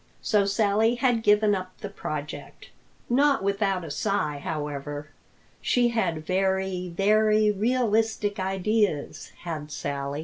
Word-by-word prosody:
So 205 -2 +2
Sally 215 +3 +2
had 245 -2 +1
given 210 0 +4
up 185 -1 -4
the 205 - -6
project, 155 -7 -7 0.4
not 275 0 +3
without 195 -2 0
a 155 - -6
sigh 150 -2 -1
however. 145 -1 -4 0.5
She 245 -1 +2
had 170 -9 -1
very, 190 0 0
very 215 +3 +3
realistic 220 -1 0
ideas, 190 -3 -1
had 155 -3 -5
Sally. 140 0 -3
195 Hz, 115 wpm, -26 LUFS, 165-215 Hz, 0.5 s, given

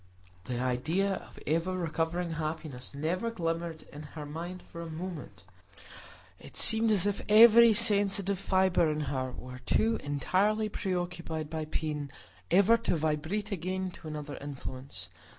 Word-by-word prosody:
The 125 -1 -3
idea 155 +11 0
of - - -8
ever 165 +5 0
recovering 170 0 -1
happiness 155 -5 -5
never 175 +10 -1
glimmered 165 -5 -3
in 145 - -8 0.2
her 150 - -5
mind 170 +5 -6
for 170 - -9
a 165 - -6
moment; 170 +1 -7 1.0
it - - -10
seemed 225 0 +5
as 200 -3 +3
if 205 -1 0
every 230 +2 +9
sensitive 200 -3 +2
fibre 185 -4 +3
in 150 0 -2
her 130 -3 -2
were 125 0 -9
too 225 - +1
entirely 200 +9 +1
preoccupied 175 -5 -3
by 160 -1 -3
pain 150 -2 -3 0.4
ever 200 +5 +5
to 230 - 0
vibrate 160 +7 -1
again 185 0 -2
to 165 - -11
another 150 -2 -6
influence. 135 -2 -7
170 Hz, 140 wpm, -30 LUFS, 150-195 Hz, 1.0 s, every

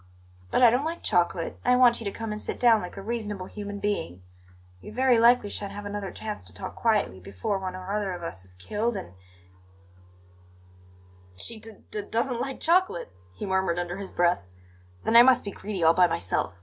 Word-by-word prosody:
"But 250 - +2
I 235 - +9
don't 250 +4 +1
like 330 +2 -4
chocolate, 170 -1 0
and 250 - +4
I - - +3
want 245 -2 +5
you - - -7
to 200 - -1
come 225 +1 -5
and 210 0 -4
sit - - -4
down 230 -3 +5
like 180 - -8
a 195 - -6
reasonable 210 -4 -3
human 205 +1 -6
being. 145 - -3 0.6
We - - -10
very 250 +1 +3
likely 235 -3 +5
shan't 200 -1 -4
have 205 0 -7
another 205 -1 -4
chance 215 -1 -6
to - - -11
talk - - -6
quietly 215 - +1
before 100 - -3
one 185 -1 -4
or 185 +2 -5
other 205 -2 -1
of 175 -1 -7
us 95 - -6
is 90 -1 -15
killed, 210 - -2
and 90 - -6 1.1
" 90 0 -27
"She 220 - -6
d 225 +1 -9 0.2
d 210 - -3
doesn't 235 +4 -1
like 270 +1 -4
chocolate!" 335 - +2 0.2
he - - -5
murmured 190 -3 +1
under 175 +1 -3
his 195 -1 -6
breath. 175 0 +2 0.6
"Then 225 - +1
I 235 - +12
must 255 0 +5
be 200 - -5
greedy 195 -3 -4
all 165 +1 +6
by 180 +1 +5
myself. 90 - -2
200 Hz, 210 wpm, -27 LUFS, 165-225 Hz, 1.1 s, I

